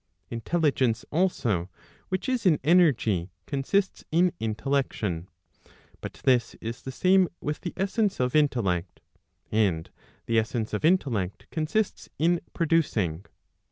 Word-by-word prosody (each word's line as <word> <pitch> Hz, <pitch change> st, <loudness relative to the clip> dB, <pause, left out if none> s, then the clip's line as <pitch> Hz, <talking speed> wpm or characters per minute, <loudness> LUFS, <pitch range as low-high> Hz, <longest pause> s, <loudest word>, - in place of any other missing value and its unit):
Intelligence 125 Hz, -2 st, +1 dB
also 120 Hz, -, 0 dB, 0.4 s
which 185 Hz, +7 st, -2 dB
is 255 Hz, -2 st, 0 dB
in 160 Hz, -4 st, +5 dB
energy, 125 Hz, -, +3 dB, 0.2 s
consists 170 Hz, +8 st, 0 dB
in 175 Hz, +3 st, +4 dB
intellection. 110 Hz, -6 st, -1 dB, 0.7 s
But -, -, -6 dB
this 125 Hz, -3 st, +2 dB
is 115 Hz, +1 st, -6 dB
the 130 Hz, -, -6 dB
same 185 Hz, +5 st, +4 dB
with 150 Hz, 0 st, -3 dB
the 175 Hz, -, -5 dB
essence 200 Hz, +1 st, 0 dB
of 125 Hz, +1 st, 0 dB
intellect. 100 Hz, -, +1 dB, 0.5 s
And 95 Hz, -7 st, +1 dB, 0.3 s
the 115 Hz, -1 st, +3 dB
essence 110 Hz, 0 st, -2 dB
of 105 Hz, -, -2 dB
intellect 125 Hz, -, +1 dB
consists 165 Hz, +7 st, -1 dB
in 170 Hz, +2 st, +2 dB
producing. 115 Hz, -, 0 dB
135 Hz, 120 wpm, -27 LUFS, 110-175 Hz, 0.7 s, in